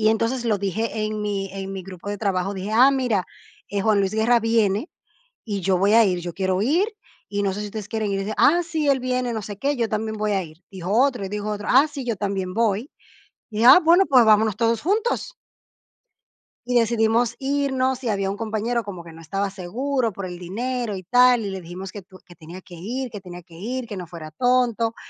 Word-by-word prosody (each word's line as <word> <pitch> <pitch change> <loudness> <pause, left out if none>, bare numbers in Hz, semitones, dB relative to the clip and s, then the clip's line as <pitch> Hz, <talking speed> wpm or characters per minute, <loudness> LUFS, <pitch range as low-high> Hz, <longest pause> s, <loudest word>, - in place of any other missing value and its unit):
Y 215 - +4
entonces 230 +3 0
lo 215 -3 +1
dije 215 +3 -2
en 215 0 -3
mi 200 -2 -2
en 195 0 -5
mi 190 -1 -5
grupo 190 +1 -9
de 205 - -4
trabajo, 195 -2 -1
dije: 195 +2 -5
"Ah, 250 +5 +6
mira, 250 -8 0 0.4
eh, 200 0 -2
Juan 210 0 +3
Luis 195 -1 0
Guerra 230 +2 +3
viene, 225 - +1 0.5
y 205 -4 -3
yo 185 0 +2
voy 200 +3 +3
a 230 0 +7
ir, 180 -3 0
yo 175 0 -5
quiero 190 0 0
ir 320 - +2 0.4
y 205 0 -2
no 195 - 0
sé 195 - -6
si 210 - -4
ustedes 210 0 -7
quieren 220 -3 -2
ir". 195 - -1
Dice: 210 +2 -3
"Ah, 345 +4 +4
sí, 320 -3 -1
él 275 -2 +3
viene, 250 -1 -1
no 220 -2 -3
sé 205 0 -7
qué, 285 +4 0
yo 230 -2 0
también 220 0 -2
voy 210 0 -1
a 190 -2 0
ir", 155 -1 -14
dijo 190 0 -5
otro. 245 -2 +2
Y 190 - -4
dijo 210 +1 -4
otro: 210 0 -4
"Ah, 270 +4 +6
sí, 280 -3 -6
yo 235 -2 -1
también 190 -2 -3
voy". 225 +2 0 0.6
Dije: 220 +2 +1
"Ah, 260 +8 +10
bueno, 345 +4 +6
pues, 255 -4 +6
vámonos 215 -1 +4
todos 230 -1 +1
juntos". 445 +7 0 1.3
Y 245 0 +3
decidimos 230 +1 +2
irnos. 265 -2 0
Y - - -1
había 195 -2 0
un 200 - -4
compañero 225 +1 -2
como 185 -4 -8
que 165 - -11
no 165 - -13
estaba 195 +5 -2
seguro, 230 +6 -2
por 190 0 -6
el 180 -1 -7
dinero 230 +4 -3
y 185 - -7
tal, 245 +5 +5
y 200 - -3
le 190 -1 -5
dijimos 180 +2 -8
que 205 - -8
tu 185 0 -17
Que 175 -1 -16
tenía 170 +3 -11
que 180 - -14
ir, 240 +9 -4
que 205 -2 -8
tenía 180 -1 -10
que 170 0 -18
ir, 240 +8 -4
que 210 - -7
no 180 -2 -6
fuera 160 -2 -9
tonto, 235 +3 +1
215 Hz, 235 wpm, -23 LUFS, 195-245 Hz, 1.3 s, Ah